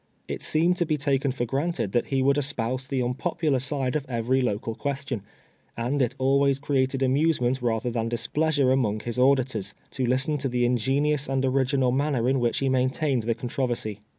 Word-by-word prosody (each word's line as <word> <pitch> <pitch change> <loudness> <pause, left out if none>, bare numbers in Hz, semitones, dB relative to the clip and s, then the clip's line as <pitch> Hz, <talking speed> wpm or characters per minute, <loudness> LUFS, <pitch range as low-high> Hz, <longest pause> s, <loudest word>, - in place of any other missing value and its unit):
It - - -5
seemed 170 +3 +2
to 175 - +1
be 155 -1 +1
taken 140 -1 +1
for 125 -1 -2
granted 135 - -2
that 120 - 0
he 135 -1 0
would 140 +2 +3
espouse 130 -2 -1
the 135 -1 -1
nnp()])ular 135 +2 -1
side 135 -1 -1
of 150 - 0
every 125 +2 +1
local 115 -1 -2
question, 140 -2 -3 0.6
and 125 +5 -1
it 125 - 0
al 135 +1 +3
ways 140 -1 +2
created 135 -1 0
amusement 130 -2 +1
rather 120 0 -1
than 115 -1 -2
displeasure 145 +3 +1
among 110 -5 +1
his 120 +2 -4
auditors, 130 -5 +1 0.2
to 130 -2 -2
listen 135 +4 +1
to 135 0 -1
the 125 0 +1
ingenious 135 +5 +1
and 135 0 0
original 130 -1 +2
manner 135 -2 0
in 135 0 +2
which 120 -1 +1
he 135 - +1
maintained 130 +1 +1
the 115 +1 -1
contro 125 +2 -2
versy. 110 -4 -4
130 Hz, 190 wpm, -25 LUFS, 120-140 Hz, 0.6 s, would